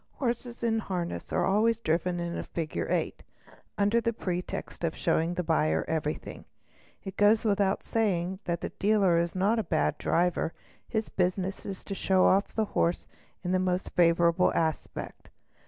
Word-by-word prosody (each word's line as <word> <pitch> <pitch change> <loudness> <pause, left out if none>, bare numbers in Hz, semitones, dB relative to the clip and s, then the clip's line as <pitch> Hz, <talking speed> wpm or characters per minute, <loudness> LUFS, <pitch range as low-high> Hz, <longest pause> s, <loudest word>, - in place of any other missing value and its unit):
Horses 240 -2 -3
in 225 -1 +2
harness 180 -5 -4
are - - +1
always 220 +3 +3
driven 175 -3 0
in 170 0 -3
a - - -2
figure 160 -2 -3
of - - -5
eight, - - -1 0.6
under 205 +3 +3
the 230 - +1
pretext 180 -3 -4
of 165 -1 0
showing 165 +2 +1
the 180 - -1
buyer 80 - +1
everything; 155 -1 -3 0.6
it 195 -1 -7
goes 215 +2 +4
without 200 -2 +1
saying 190 -4 0
that 170 -1 -2
the - - -3
dealer 195 -5 +2
is 170 +1 -1
not 205 +5 +2
a - - 0
bad 170 - 0
driver, 175 -1 +1 0.3
his 220 -1 -2
business 185 +1 -1
is 195 -2 -6
to 200 - -5
show 190 -1 +2
off 195 +2 +4
the 220 - -1
horse 170 +1 +1 0.4
in 180 - -2
the 185 - +3
most 185 0 -1
favourable 170 0 +4
aspect. 160 -2 -3
185 Hz, 170 wpm, -28 LUFS, 170-205 Hz, 0.6 s, goes